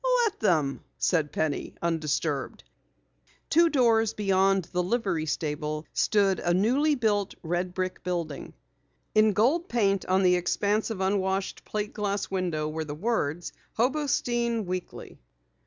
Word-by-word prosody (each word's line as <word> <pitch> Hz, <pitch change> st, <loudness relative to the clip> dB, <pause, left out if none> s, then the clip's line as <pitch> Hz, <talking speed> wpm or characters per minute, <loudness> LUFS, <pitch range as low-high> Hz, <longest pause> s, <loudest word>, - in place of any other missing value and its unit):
"Let 430 Hz, -, -2 dB
them," 155 Hz, -9 st, +1 dB
said 160 Hz, -5 st, +1 dB
Penny, 155 Hz, -2 st, -2 dB
undisturbed. 155 Hz, -4 st, -2 dB, 0.9 s
Two 335 Hz, +1 st, +5 dB
doors 225 Hz, -6 st, +3 dB
beyond 195 Hz, -2 st, +2 dB
the 180 Hz, -, +1 dB
livery 180 Hz, -5 st, -1 dB
stable 150 Hz, 0 st, -3 dB
stood 200 Hz, -3 st, +2 dB
a 175 Hz, 0 st, +1 dB
newly 265 Hz, +10 st, +3 dB
built 205 Hz, -5 st, 0 dB
red 175 Hz, +2 st, -2 dB
brick 185 Hz, 0 st, -3 dB
building. 170 Hz, -5 st, -4 dB, 0.6 s
In 215 Hz, 0 st, +4 dB
gold 270 Hz, -, +2 dB
paint 200 Hz, -5 st, +1 dB
on 190 Hz, +1 st, +3 dB
the 180 Hz, -1 st, +5 dB
expanse 205 Hz, +5 st, 0 dB
of 210 Hz, -4 st, -4 dB
unwashed 190 Hz, 0 st, -1 dB
plate 210 Hz, 0 st, -3 dB
glass 205 Hz, -1 st, -2 dB
window 175 Hz, -5 st, -1 dB
were 160 Hz, +1 st, -3 dB
the 145 Hz, -1 st, -6 dB
words: 175 Hz, -4 st, -2 dB, 0.2 s
"Hobostein 240 Hz, -3 st, 0 dB
Weekly." 180 Hz, 0 st, -6 dB
190 Hz, 130 wpm, -27 LUFS, 170-220 Hz, 0.9 s, Two